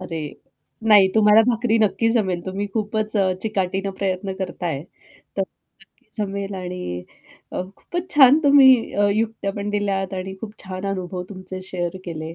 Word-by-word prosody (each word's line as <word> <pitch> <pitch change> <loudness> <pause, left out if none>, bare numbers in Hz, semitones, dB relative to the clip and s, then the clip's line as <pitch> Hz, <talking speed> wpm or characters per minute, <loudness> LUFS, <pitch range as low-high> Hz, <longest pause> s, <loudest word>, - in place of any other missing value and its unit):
अरे, 175 -3 -6 0.7
नाही 200 -3 +7
तुम्हाला 215 0 +6
भाकरी 230 -1 +2
नक्की 220 +2 +2
जमेल. 190 -7 0
तुम्ही 195 +2 -3
खूपच 215 0 -1
अ, 190 -2 +3
चिकाटीने 195 -2 -1
प्रयत्न 190 0 -1
करता 180 -1 -4
आहे, 145 -3 -2 0.5
तर 195 - +2
नक्की 195 +1 -16
जमेल 200 -1 -3
आणि 180 - -5 0.5
अ, - - -2
खूपच 350 +1 -5
छान 280 +1 +8
तुम्ही 275 -2 +8 0.2
अ, 205 0 +3
युक्त्यापण 210 -2 -2
दिल्यात 195 -2 -1
आणि 190 +1 -5
खूप 215 -2 -7
छान 185 +1 -5
अनुभव 180 -1 -4
तुमचे 185 -1 -7
शेअर 175 0 -3
केले. 165 -1 -6
195 Hz, 150 wpm, -22 LUFS, 185-215 Hz, 0.7 s, छान